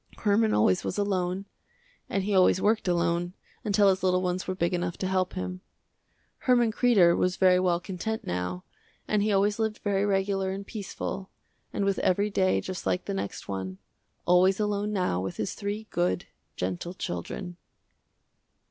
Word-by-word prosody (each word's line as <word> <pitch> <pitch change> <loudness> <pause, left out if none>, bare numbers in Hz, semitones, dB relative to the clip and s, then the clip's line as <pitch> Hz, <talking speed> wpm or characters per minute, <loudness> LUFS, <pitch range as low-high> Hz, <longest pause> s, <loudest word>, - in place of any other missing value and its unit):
Herman 215 +1 +2
always 95 -3 +3
was - - -3
alone, 190 -1 -1 0.6
and 195 - 0
he 205 +1 -1
always 185 -1 +5
worked 215 +1 +1
alone, 175 +1 0 0.3
until 205 -1 +3
his 190 -1 +3
little 185 0 +2
ones 180 +1 -2
were 185 - -2
big 170 0 0
enough 175 -1 -2
to 190 - -2
help 185 -1 0
him. 90 0 -4 0.8
Herman 240 -3 +3
Kreder 215 -8 +4
was 180 0 +1
very 185 -1 +5
well 180 -2 +2
content 205 +5 -4
now 90 0 -3 0.4
and 210 -1 +2
he 210 +1 +1
always 205 +2 +2
lived 220 -1 0
very 200 -1 +1
regular 195 -1 +1
and 195 +1 -4
peaceful, 195 -2 -5 0.4
and 200 - -1
with 195 -1 +1
every 200 +3 +1
day 185 -1 +2
just 185 -1 -5
like 180 - 0
the 200 - -3
next 100 - -4
one, 95 -1 -4 0.5
always 185 +2 +4
alone 210 0 0
now 180 - 0
with 95 - -4
his 195 - -2
three 205 +1 -4
good, 90 0 0 0.3
gentle 95 - -3
children. 175 - -5
190 Hz, 165 wpm, -27 LUFS, 175-205 Hz, 0.8 s, always